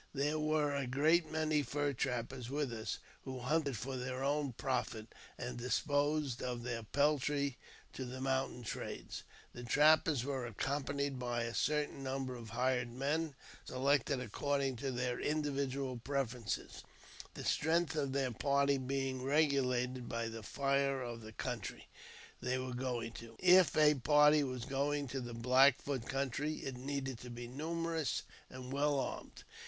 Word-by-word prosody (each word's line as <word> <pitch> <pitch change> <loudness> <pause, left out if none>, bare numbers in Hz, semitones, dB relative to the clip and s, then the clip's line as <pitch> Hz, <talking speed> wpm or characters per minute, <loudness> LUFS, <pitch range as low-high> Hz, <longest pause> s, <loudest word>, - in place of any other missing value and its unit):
There 145 +3 +1
were 155 -1 +2
a 140 -2 -1
great 155 +5 +3
many 155 -1 +2
fur 145 +2 -1
trappers 125 0 -2
with 140 -3 -1
us, 110 -1 -3 0.3
who 130 -1 -5
hunted 140 0 0
for 130 +5 -4
their 130 +1 -3
own 140 -1 0
profit, 115 -3 -2 0.2
and 120 -1 -5
disposed 145 +1 +1
of 125 -1 -3
their 120 -2 -2
peltry 140 +2 +1 0.3
to 130 - -4
the 125 +1 -6
mountain 130 -2 -1
traders. 110 - -5 0.3
The 120 - -7
trappers 150 +1 +5
were 135 -3 -2
accompanied 140 +3 -2
by 120 -1 -1
a 115 0 -3
certain 150 0 0
number 135 -1 -2
of 115 -3 -8
hired 125 +1 +1
men, 145 +4 -1 0.3
selected 140 +1 +1
according 135 +2 -1
to 135 +4 -2
their 125 0 -1
individual 140 -3 -1
preferences, 125 -3 -3 0.5
the - - -6
strength 165 +1 +2
of 140 -3 0
their 135 -2 0
party 140 +3 +2
being 135 0 -2
regulated 130 -3 +1
by 115 0 -2
the 115 0 -7
danger 140 +2 +1
of 120 -1 -5
the 110 0 -9
country 115 -2 -5 0.5
they 125 +1 0
were 130 0 -3
going 125 -2 -2
to. 115 0 -10
If 180 -4 +6
a 150 -1 +7
party 150 +2 +5
was 130 -3 -3
going 140 0 0
to 135 +1 -3
the 120 -1 -6
Black 130 +3 +5
Foot 135 -5 -3
country, 140 +3 -1
it 135 - -3
needed 135 -1 -3
to 125 - -8
be 120 0 -6
numerous 160 +3 -2 0.3
and 130 0 -7
well 145 0 +2
armed. - - -5
135 Hz, 155 wpm, -35 LUFS, 125-145 Hz, 0.5 s, a